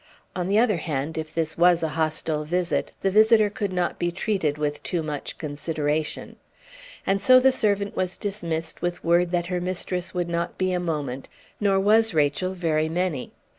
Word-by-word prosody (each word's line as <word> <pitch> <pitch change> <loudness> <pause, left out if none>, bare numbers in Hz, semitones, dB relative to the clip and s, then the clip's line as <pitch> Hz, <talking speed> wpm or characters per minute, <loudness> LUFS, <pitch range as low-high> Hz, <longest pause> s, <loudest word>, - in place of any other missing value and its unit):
On 180 -1 -2
the 200 +2 +2
other 220 -4 +3
hand, 155 -1 -3
if 155 -1 -4
this 160 0 -2
was 175 -1 +5
a 160 - 0
hostile 155 -1 -1
visit, 175 +3 -1
the 195 - +1
visitor 215 0 +5
could 205 -2 -3
not 180 -1 -1
be 175 0 0
treated 180 -5 -1
with 150 -1 -2
too 175 -3 -2
much 150 -2 -5
consideration. 150 0 -3 0.7
And 195 0 +1
so 255 0 +7
the 265 +1 +5
servant 205 -4 0
was 185 0 -1
dismissed 165 -6 -4
with 175 0 -3
word 170 +1 +3
that 175 -1 0
her 180 - -1
mistress 180 0 -3
would 175 -1 -2
not 170 0 -2
be 185 -1 0
a 180 - 0
moment; 145 -7 -3 0.3
nor 195 -2 +2
was 215 0 +3
Rachel 155 +5 +1
very 160 -3 0
many. 170 -5 -2
175 Hz, 180 wpm, -24 LUFS, 155-195 Hz, 0.7 s, so